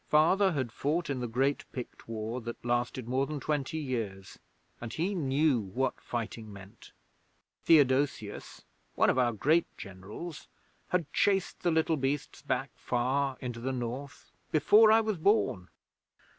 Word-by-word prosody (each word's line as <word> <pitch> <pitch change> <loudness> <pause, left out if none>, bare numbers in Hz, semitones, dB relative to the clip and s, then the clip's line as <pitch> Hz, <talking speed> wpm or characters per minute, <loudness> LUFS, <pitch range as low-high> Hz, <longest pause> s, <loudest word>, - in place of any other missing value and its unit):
Father 185 +5 +4
had 130 -6 -2
fought 150 +5 -1
in 135 - -2
the 125 - -2
great 135 +5 0
Pict 125 -2 -8
War 115 +2 -4
that 120 +1 -7
lasted 120 0 -1
more 130 +2 0
than 150 -1 -4
twenty 150 +1 -2
years, 110 -10 -4 0.4
and 120 -1 -5
he 175 +9 -1
knew 145 -4 +2
what 115 +6 -2
fighting 115 -2 -5
meant. 100 -1 -13 0.7
Theodosius, 135 -7 +2 0.3
one - - +4
of 130 - 0
our 120 -1 +3
great 155 +10 +2
Generals, 100 - -8 0.4
had 170 -5 -1
chased 195 -2 +1
the 175 - +2
little 160 -1 +2
beasts 135 +1 -2
back 135 -1 -2
far 130 +2 -1
into 120 -2 -5
the 130 +3 -2
North 130 +3 -6 0.2
before 210 +9 +6
I 225 +1 +6
was 215 -3 -1
born. 130 - +2
135 Hz, 145 wpm, -30 LUFS, 120-155 Hz, 0.7 s, before